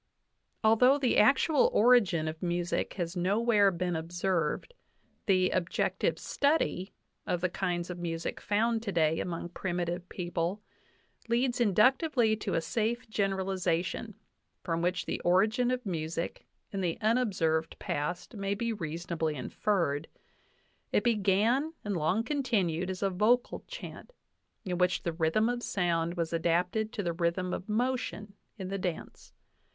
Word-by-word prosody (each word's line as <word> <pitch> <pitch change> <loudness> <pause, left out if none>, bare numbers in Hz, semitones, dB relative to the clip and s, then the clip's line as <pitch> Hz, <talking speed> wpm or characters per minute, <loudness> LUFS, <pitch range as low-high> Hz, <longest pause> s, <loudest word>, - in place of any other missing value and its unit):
Although 250 +5 +5
the 265 -4 +2
actual 275 +5 +4
origin 210 -9 +4
of 155 +1 -5
music 175 -1 -1
has 175 -1 -3
nowhere 205 +3 +3
been 180 -1 -2
ob 160 +1 -5
served, 175 - -1 0.5
the 185 -2 +3
"objective 185 -1 0
study" 280 - 0 0.4
of 180 - 0
the 185 - +1
kinds 175 0 -2
of 175 - -7
music 165 -1 -4
found 225 +2 +1
today 165 -7 +1
among 170 -1 -4
primitive 175 0 -3
people 175 +2 -2 0.7
leads 245 +1 +1
inductively 240 - +3
to 200 -3 -2
a 165 - +1
safe 230 +6 -1
gener 195 -2 0
alization, 185 +3 -1 0.5
from 165 -2 -1
which 180 +1 0
the - - -3
origin 215 +8 +3
of 250 -1 -2
music 165 -2 -4 0.2
in 195 - -3
the 170 -3 -1
unobserved 195 -9 +1
past 175 - -3
may 200 0 -1
be 230 +2 -1
reasonably 165 -3 -3
inferred. 160 0 -1 0.8
It - - +2
began 230 - +2
and 205 -1 -1
long 175 +7 +1
continued 210 - 0
as 190 +1 -4
a 195 - +1
vocal 220 +7 +2
chant, - - -9 0.5
in 180 -2 -2
which 180 0 +2
the 170 - -1
rhythm 165 +7 +2
of 245 0 -1
sound 170 -5 0
was 170 -1 -2
adapted 180 +6 +1
to 205 - -3
the 170 -1 -1
rhythm 175 +2 -1
of 185 - -5
motion 225 -3 -1 0.2
in 190 -2 -5
the 195 0 -3
dance. 180 -3 -5
185 Hz, 140 wpm, -30 LUFS, 170-220 Hz, 0.8 s, Although